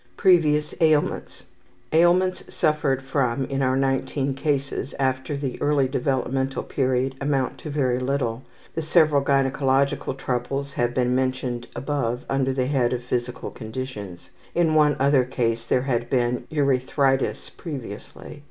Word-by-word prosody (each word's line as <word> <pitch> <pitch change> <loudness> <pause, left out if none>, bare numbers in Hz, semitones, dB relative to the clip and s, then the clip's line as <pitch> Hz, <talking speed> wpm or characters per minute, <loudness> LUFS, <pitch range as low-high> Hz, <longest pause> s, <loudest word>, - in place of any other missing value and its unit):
Previous 155 -6 +3
Ailments. 155 -2 +1 0.5
Ailments 180 +3 +3
suffered 140 -4 +1
from 135 -1 0
in 135 0 -2
our 130 -1 +2
19 135 +1 0
cases 140 -1 -2
after 130 +2 -1
the 135 -3 -4
early 145 -2 +2
developmental 130 0 -1
period 130 -1 0
amount 135 -2 0
to 155 - -7
very 130 -4 0
little. 125 -3 -1 0.3
The 160 - -2
several 155 -2 +4
gynecological 135 -1 +1
troubles 135 +2 -3
have 120 0 -1
been 125 -1 +2
mentioned 130 -2 -1
above 125 -2 -2
under 135 -1 +1
the 130 -1 0
head 130 -3 +1
of 125 -1 -3
Physical 125 0 -3
Conditions. 110 -7 -7 0.2
In 170 -2 +3
one 150 -2 +4
other 135 -1 +4
case 115 -2 -1
there 125 - +1
had 120 -3 -1
been 125 -1 0
urethritis 135 -1 +1
previously. 140 - -8
135 Hz, 135 wpm, -24 LUFS, 125-145 Hz, 0.5 s, several